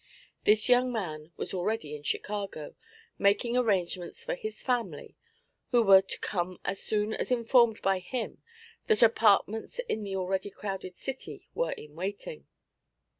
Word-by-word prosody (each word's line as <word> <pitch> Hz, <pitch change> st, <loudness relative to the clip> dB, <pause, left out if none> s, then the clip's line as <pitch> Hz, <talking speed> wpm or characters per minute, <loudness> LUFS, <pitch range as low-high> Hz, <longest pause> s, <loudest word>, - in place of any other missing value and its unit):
This 210 Hz, 0 st, +4 dB
young 250 Hz, 0 st, +4 dB
man 160 Hz, -8 st, -4 dB
was -, -, -4 dB
already 185 Hz, -5 st, -2 dB
in 150 Hz, -, -9 dB
Chicago, 200 Hz, -1 st, -3 dB, 0.5 s
making 205 Hz, +4 st, +2 dB
arrangements 185 Hz, -7 st, 0 dB
for -, -, -2 dB
his 215 Hz, +4 st, -6 dB
family, 245 Hz, -3 st, -2 dB, 0.5 s
who 240 Hz, -2 st, +4 dB
were 195 Hz, -2 st, +8 dB
to 195 Hz, -, -6 dB
come 180 Hz, -1 st, -2 dB
as 195 Hz, -, -2 dB
soon 210 Hz, 0 st, 0 dB
as -, -, -2 dB
informed 235 Hz, -2 st, +4 dB
by 195 Hz, -1 st, +2 dB
him 235 Hz, +6 st, -5 dB, 0.5 s
that 440 Hz, -, +5 dB
apartments 225 Hz, -, +3 dB
in 220 Hz, -, -1 dB
the 200 Hz, -2 st, -4 dB
already 190 Hz, +1 st, -1 dB
crowded 195 Hz, -2 st, -6 dB
city 265 Hz, 0 st, -6 dB
were -, -, 0 dB
in 150 Hz, -1 st, -11 dB
waiting. 200 Hz, -, -5 dB
205 Hz, 145 wpm, -29 LUFS, 185-235 Hz, 0.5 s, were